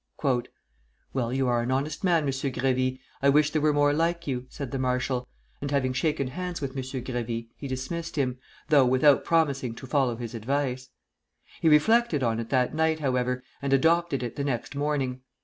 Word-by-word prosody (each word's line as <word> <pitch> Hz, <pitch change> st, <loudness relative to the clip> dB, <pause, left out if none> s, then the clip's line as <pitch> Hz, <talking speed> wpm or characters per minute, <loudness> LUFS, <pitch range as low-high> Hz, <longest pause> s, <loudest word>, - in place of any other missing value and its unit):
"Well, 120 Hz, -3 st, -1 dB
you 130 Hz, 0 st, +1 dB
are 120 Hz, -1 st, +2 dB
an 120 Hz, -, -3 dB
honest 140 Hz, +5 st, -1 dB
man, 170 Hz, -4 st, +3 dB
M. 140 Hz, -, 0 dB
Grévy; 130 Hz, -1 st, 0 dB, 0.2 s
I 140 Hz, -, +4 dB
wish 150 Hz, +1 st, +4 dB
there 155 Hz, -, 0 dB
were 155 Hz, 0 st, +4 dB
more 145 Hz, 0 st, +3 dB
like 170 Hz, +2 st, 0 dB
you," 130 Hz, -2 st, -3 dB
said 140 Hz, -4 st, -6 dB
the 135 Hz, -, -2 dB
marshal; 125 Hz, 0 st, -1 dB, 0.3 s
and 140 Hz, -, -3 dB
having 135 Hz, -2 st, +1 dB
shaken 140 Hz, -1 st, 0 dB
hands 180 Hz, +3 st, -4 dB
with 140 Hz, -2 st, -3 dB
M. 135 Hz, 0 st, -4 dB
Grévy, 120 Hz, -3 st, -4 dB
he 140 Hz, -, -7 dB
dismissed 155 Hz, +6 st, -4 dB
him, 130 Hz, -4 st, -1 dB, 0.3 s
though 145 Hz, -3 st, +6 dB
without 130 Hz, +3 st, +5 dB
promising 140 Hz, -7 st, +1 dB
to 130 Hz, -, -9 dB
follow 130 Hz, -3 st, +1 dB
his 120 Hz, 0 st, -6 dB
advice. 130 Hz, +2 st, -2 dB, 0.7 s
He 160 Hz, -, +4 dB
reflected 155 Hz, -, +4 dB
on 115 Hz, -1 st, +1 dB
it 115 Hz, -1 st, -5 dB
that 130 Hz, -1 st, +1 dB
night, 160 Hz, 0 st, +1 dB
however, 125 Hz, -2 st, 0 dB, 0.2 s
and 140 Hz, -1 st, 0 dB
adopted 160 Hz, -1 st, +3 dB
it 120 Hz, -, -5 dB
the 140 Hz, -, -1 dB
next 135 Hz, -1 st, -3 dB
morning. 140 Hz, -3 st, -1 dB
135 Hz, 185 wpm, -27 LUFS, 125-150 Hz, 0.7 s, though